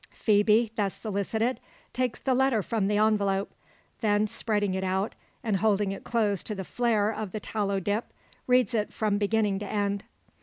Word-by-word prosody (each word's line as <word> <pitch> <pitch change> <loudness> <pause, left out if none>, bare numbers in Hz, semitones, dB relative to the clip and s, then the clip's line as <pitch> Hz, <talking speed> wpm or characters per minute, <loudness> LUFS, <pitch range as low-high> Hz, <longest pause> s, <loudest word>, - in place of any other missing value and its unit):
Phoebe, 215 +1 +3
thus 200 -3 0
solicited, 220 +4 -1 0.3
takes 250 -1 -1
the 265 - +1
letter 255 -4 +2
from 210 0 0
the 205 0 +1
envelope. 205 -2 +2 0.5
Then 210 -1 +2
spreading 210 -2 -1
it 190 0 -2
out, 190 +3 0 0.3
and 215 -4 +1
holding 205 -1 +2
it 195 - -6
close 210 -5 0
to 215 - -3
the 190 - -4
flare 220 0 +1
of 215 -3 -5
the 215 - -2
tallow 200 -2 -1
dip, 205 +4 -1 0.4
reads 250 0 +3
it 215 -2 0
from 210 -2 0
beginning 210 -1 +1
to 205 - -5
end. 200 -1 -1
210 Hz, 175 wpm, -28 LUFS, 200-225 Hz, 0.5 s, Phoebe